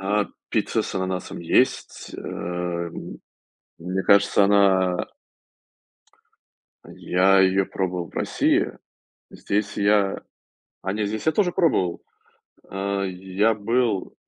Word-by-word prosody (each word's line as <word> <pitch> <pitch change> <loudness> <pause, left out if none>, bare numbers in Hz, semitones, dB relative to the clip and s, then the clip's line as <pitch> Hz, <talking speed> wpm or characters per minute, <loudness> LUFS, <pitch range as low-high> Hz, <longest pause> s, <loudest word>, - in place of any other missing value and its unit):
А, 100 +2 +1 0.3
пицца - - 0
с - - -6
ананасом 95 0 -3
есть, 85 - 0
эм. 85 -1 -5 0.6
Мне 90 +3 -3
кажется, 100 0 +4
она 95 -2 +3 1.9
а - - -13
я 95 +2 +3
её 95 0 +3
пробовал 90 -2 -3
в - - -25
России. - - +1 0.6
Здесь 105 +1 -3
я 100 -1 +2 0.6
а 95 - -1
не, 105 0 -1
здесь 110 +7 -4
я 160 - +4
тоже 180 +1 +1
пробовал. 145 - +1 0.7
Э, 100 0 -2
й 95 0 -9
я 110 +2 +4
был 110 -1 -1
95 Hz, 115 wpm, -23 LUFS, 95-105 Hz, 1.9 s, кажется